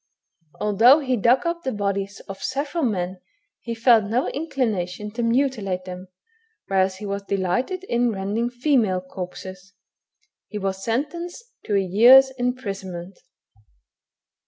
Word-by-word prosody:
Although 230 +8 +5
he 260 -2 0
dug 240 - +3
up 340 0 -1
the 265 - -2
bodies 200 -1 -3
of 195 0 -10
several 285 +5 -2
men 185 -5 -1 0.4
he 230 -1 -5
felt 230 -2 +5
no 235 +6 0
inclination 210 - -2
to 235 +3 -4
mutilate 230 -7 0
them, 185 0 -8 0.6
whereas 190 -1 +1
he 200 0 -4
delighted 225 - -1
in 240 -8 +1
rending 210 +4 -2
female 245 -7 +1
corpses. 185 +1 -8 0.7
He 210 - -6
was 195 -1 -3
sentenced 340 - -3
to 205 - 0
a - - +4
year's 240 +8 +7
imprisonment. 195 -8 -5
215 Hz, 125 wpm, -23 LUFS, 195-255 Hz, 0.7 s, year's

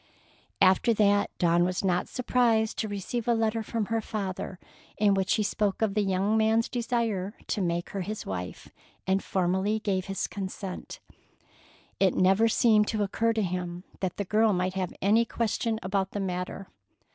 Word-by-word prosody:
After 190 +5 +4
that 205 -1 +3
Dawn 175 -1 +3
was 180 +1 -1
not 180 -1 +1
surprised 235 -3 +1
to 220 - -1
receive 210 +4 -4
a 235 - +4
letter 225 0 0
from 220 0 -2
her 225 +2 -1
father 195 -4 -4 0.4
in 205 -1 +4
which 195 0 +1
he 215 - +1
spoke 205 0 0
of 210 -3 +1
the 210 - +2
young 195 +2 +1
man's 220 +1 +3
desire 230 -5 -1
to 210 - -2
make 175 -1 -1
her 195 - -3
his 210 +4 -5
wife, 90 -1 -5 0.4
and 190 +1 +1
formally 190 +3 0
gave 190 -3 -1
his 195 0 -2
consent. 190 -1 -6 1.0
It 195 -2 +3
never 195 +5 +4
seemed 215 -2 +4
to 215 -2 0
occur 225 +3 0
to 220 -1 0
him 180 -1 -3 0.2
that 185 -2 -3
the 205 - -2
girl 215 +2 +3
might 185 0 0
have 185 -2 -2
any 215 +4 +4
question 230 -1 -1
about 190 0 -1
the 205 - -2
matter. 185 0 -4
200 Hz, 170 wpm, -28 LUFS, 185-220 Hz, 1.0 s, After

